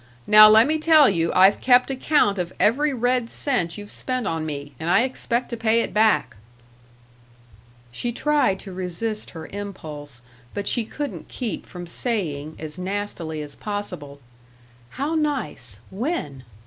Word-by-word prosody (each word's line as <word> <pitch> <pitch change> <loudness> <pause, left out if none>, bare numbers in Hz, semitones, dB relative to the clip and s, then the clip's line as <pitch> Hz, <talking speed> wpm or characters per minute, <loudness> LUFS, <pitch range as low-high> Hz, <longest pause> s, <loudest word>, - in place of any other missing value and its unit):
Now 215 0 +9
let 220 +2 +7
me 310 +3 0
tell 310 -3 +6
you 170 -3 +1
I've 190 +2 +5
kept 250 +1 +4
account 260 -7 +2
of 175 -1 -3
every 285 +7 +3
red 245 -1 0
cent 205 - -1
you've 205 0 -9
spent 255 -3 -3
on 160 -1 -2
me, 145 -1 -6
and 160 - -3
I 195 +6 +4
expect 250 -1 -2
to 235 - -4
pay 225 0 +2
it - - -4
back." 215 - +2 1.5
She 240 - -3
tried 290 -5 +1
to 195 - -9
resist 185 +4 -4
her 160 -1 -9
impulse, 150 -10 -8 0.3
but 200 -1 -3
she 235 -3 +1
couldn't 225 - -6
keep 240 -4 -5
from 180 -2 -8
saying, 165 - -3
as 155 +2 -8
nastily 180 -5 -4
as 145 -1 -9
possible: 175 -10 -6 0.7
"How 285 +5 -3
nice. 270 - -3
When?" 190 - -4
205 Hz, 150 wpm, -23 LUFS, 165-245 Hz, 1.5 s, Now